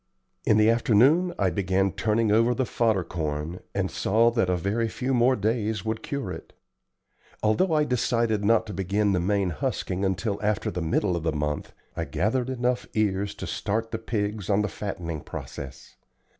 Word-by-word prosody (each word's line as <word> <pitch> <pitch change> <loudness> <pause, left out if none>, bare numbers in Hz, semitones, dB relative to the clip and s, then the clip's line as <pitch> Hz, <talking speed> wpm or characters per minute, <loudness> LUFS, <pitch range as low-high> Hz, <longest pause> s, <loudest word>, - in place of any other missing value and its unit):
In 105 - +4
the 110 0 +5
afternoon 125 - +4
I 95 -3 +2
began 95 +2 +1
turning 110 +2 +1
over 115 +3 +4
the 130 - 0
fodder 110 -6 +1
corn, 80 +1 -4 0.2
and 95 -2 0
saw 115 +3 +3
that 115 -6 +1
a 90 - +2
very 110 +6 -1
tew 130 +3 -2
more 125 +1 +4
days 110 -1 -1
would 110 0 -2
cure 140 -2 -4
it. - - -9 0.9
Although 110 - +2
I 150 -1 +4
decided 115 -5 +1
not 115 +2 +3
to 105 - -7
begin 100 +3 +1
the 90 - +2
main 95 0 +1
husking 90 +5 -2
until 95 +2 -1
after 105 -1 0
the 90 - -3
middle 85 +3 +1
of 85 - -2
the 80 0 0
month, 75 0 -3 0.2
I - - -2
gathered 120 +6 0
enough 125 -1 -1
ears 100 -1 0
to - - -6
start 110 +2 -2
the 115 - -3
pigs 105 -3 -3
on 105 +1 +3
the - - 0
fattening 85 -6 -5
process. 70 -1 -9
105 Hz, 180 wpm, -26 LUFS, 95-115 Hz, 0.9 s, the